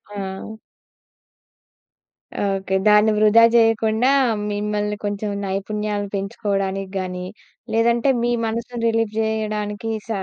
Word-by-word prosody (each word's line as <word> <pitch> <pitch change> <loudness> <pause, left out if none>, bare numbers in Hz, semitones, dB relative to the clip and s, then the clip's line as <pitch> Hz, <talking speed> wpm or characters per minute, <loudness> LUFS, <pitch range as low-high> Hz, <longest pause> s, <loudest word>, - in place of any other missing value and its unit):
ఆ! 190 -1 -5 2.0
ఓకే. 195 -1 -1
దాన్ని 210 +1 +5
వృధా 215 +2 +6
జేయకుండా 225 +1 +3 0.4
మిమ్మల్ని 210 0 -2
కొంచెం 205 +1 -2 0.2
నైపుణ్యాలు 205 +1 -2
పెంచుకోవడానికి 195 -1 -2
గాని, 180 -1 -4 0.5
లేదంటే 235 +3 +2
మీ 240 - +1
మనసుని 235 +1 -4
రిలీఫ్ 225 -1 0
జేయడానికి 215 -1 -2 0.2
స - - -23
210 Hz, 95 wpm, -21 LUFS, 200-225 Hz, 2.0 s, వృధా